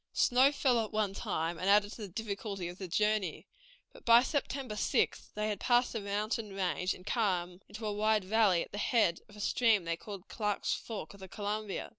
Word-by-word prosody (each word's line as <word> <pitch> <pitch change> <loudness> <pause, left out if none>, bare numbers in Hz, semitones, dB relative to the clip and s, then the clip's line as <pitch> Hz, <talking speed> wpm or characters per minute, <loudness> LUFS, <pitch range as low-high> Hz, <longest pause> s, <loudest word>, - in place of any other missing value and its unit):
Snow 255 +3 +4
fell 250 -5 +2
at 215 - -7
one 215 -2 0
time, 165 -3 -2
and 185 - 0
added 205 0 +4
to 225 - -9
the 210 - -4
difficulty 200 -1 -4
of 175 +1 -9
the 190 - -5
journey, 210 0 0 0.5
but - - -15
by 235 +1 +7
September 275 -4 -2
6th 210 - 0
they 210 0 -1
had 210 -2 -2
passed 245 0 +2
the 225 - -2
mountain 210 +1 -2
range, 185 -1 -1
and 180 - -16
had - - 0
come 180 -5 -1
into 215 +1 -7
a 210 - -1
wide 215 0 +2
valley, 200 -4 +3
at - - -13
the 205 - -5
head 210 -8 +2
of 210 - -15
a - - -12
stream 220 -2 +3
they 170 0 -1
called 195 +1 -9
Clark's 210 -2 -1
Fork 210 -8 -6
of 200 - -15
the 190 - -9
Columbia. 210 +1 -4
210 Hz, 215 wpm, -32 LUFS, 190-220 Hz, 0.5 s, by